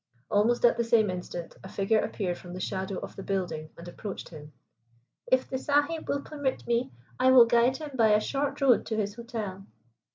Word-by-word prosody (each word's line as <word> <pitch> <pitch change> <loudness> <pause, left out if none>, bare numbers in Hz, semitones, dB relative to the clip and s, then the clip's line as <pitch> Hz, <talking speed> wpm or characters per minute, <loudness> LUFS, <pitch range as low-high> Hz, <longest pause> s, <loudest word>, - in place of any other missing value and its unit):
Almost 230 +4 +3
at 240 - +4
the 235 - +2
same 225 -3 +3
instant 175 -2 -6
a 190 - -9
figure 205 +3 +1
appeared 180 -5 -2
from 175 -1 -10
the - - -6
shadow 190 0 -3
of - - -8
the - - -7
building 175 -6 -3
and 170 - -10
approached 195 +3 -7
him. 150 -2 -11 0.8
"If 260 0 +2
the 260 - -3
Sahib 290 +3 0
will 280 - 0
permit 285 -3 -3
me, 235 +1 0 0.3
I 255 0 +5
will 255 -2 +9
guide 240 +2 +3
him 305 -2 -7
by 225 -4 +4
a 210 - +5
short 280 +5 -2
road 260 -4 +5
to 220 - -2
his 205 -1 -1
hotel." 215 -5 -6
225 Hz, 200 wpm, -28 LUFS, 190-260 Hz, 0.8 s, will